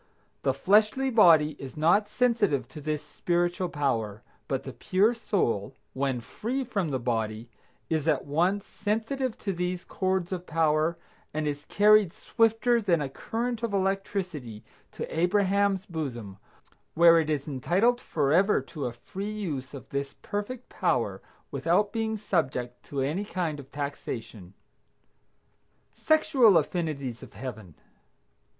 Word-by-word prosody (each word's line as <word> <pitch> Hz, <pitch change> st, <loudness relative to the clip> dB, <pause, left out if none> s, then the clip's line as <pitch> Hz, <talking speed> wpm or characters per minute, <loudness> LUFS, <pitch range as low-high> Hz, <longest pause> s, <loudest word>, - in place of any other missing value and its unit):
The 135 Hz, -, +2 dB
fleshly 215 Hz, -, +3 dB
body 165 Hz, -9 st, +6 dB
is 135 Hz, +1 st, -8 dB
not 175 Hz, +7 st, +3 dB
sensitive 225 Hz, -, +1 dB
to 150 Hz, -, -9 dB
this 150 Hz, 0 st, -3 dB
spiritual 175 Hz, +3 st, -1 dB
power, 115 Hz, -9 st, -1 dB, 0.2 s
but -, -, -2 dB
the -, -, -7 dB
pure 205 Hz, +5 st, +2 dB
soul, 130 Hz, -, -1 dB, 0.2 s
when 130 Hz, -2 st, -1 dB
free 240 Hz, -, -3 dB
from 200 Hz, -9 st, -2 dB
the 135 Hz, -, 0 dB
body, 115 Hz, -2 st, -2 dB, 0.4 s
is 160 Hz, -1 st, -1 dB
at -, -, +2 dB
once 180 Hz, +8 st, +1 dB
sensitive 225 Hz, +4 st, -2 dB
to 195 Hz, -, -3 dB
these 180 Hz, 0 st, -3 dB
chords 185 Hz, -2 st, -1 dB
of 180 Hz, -1 st, -4 dB
power 160 Hz, +1 st, +2 dB, 0.4 s
and 155 Hz, 0 st, -1 dB
is 145 Hz, 0 st, -3 dB
carried 210 Hz, -3 st, +5 dB
swifter 230 Hz, +1 st, +2 dB
than 180 Hz, -6 st, +2 dB
a 145 Hz, -2 st, -2 dB
current 230 Hz, -, -3 dB
of 230 Hz, -3 st, -2 dB
electricity 185 Hz, -, -2 dB, 0.3 s
to -, -, -4 dB
Abraham's 200 Hz, +1 st, +2 dB
bosom, 125 Hz, -, -5 dB, 0.6 s
where 170 Hz, 0 st, +7 dB
it 155 Hz, -1 st, -1 dB
is 150 Hz, -2 st, -1 dB
entitled 190 Hz, -, +1 dB
forever 165 Hz, +8 st, +2 dB
to 135 Hz, 0 st, -5 dB
a 120 Hz, -, -5 dB
free 195 Hz, -, -6 dB
use 150 Hz, -11 st, -4 dB
of 135 Hz, -, -10 dB
this 140 Hz, 0 st, -3 dB
perfect 225 Hz, +5 st, -4 dB
power -, -, 0 dB, 0.3 s
without 205 Hz, 0 st, +1 dB
being 220 Hz, -1 st, -1 dB
subject 135 Hz, -, -1 dB
to 140 Hz, -2 st, -3 dB
any 155 Hz, +9 st, -1 dB
kind 175 Hz, -7 st, -3 dB
of 135 Hz, 0 st, -12 dB
taxation. 115 Hz, -9 st, -6 dB, 1.4 s
SEXUAL 265 Hz, -, +4 dB
AFFINITIES 150 Hz, -7 st, -2 dB
OF -, -, -12 dB
HEAVEN. 110 Hz, -, -8 dB
170 Hz, 135 wpm, -28 LUFS, 140-205 Hz, 1.4 s, where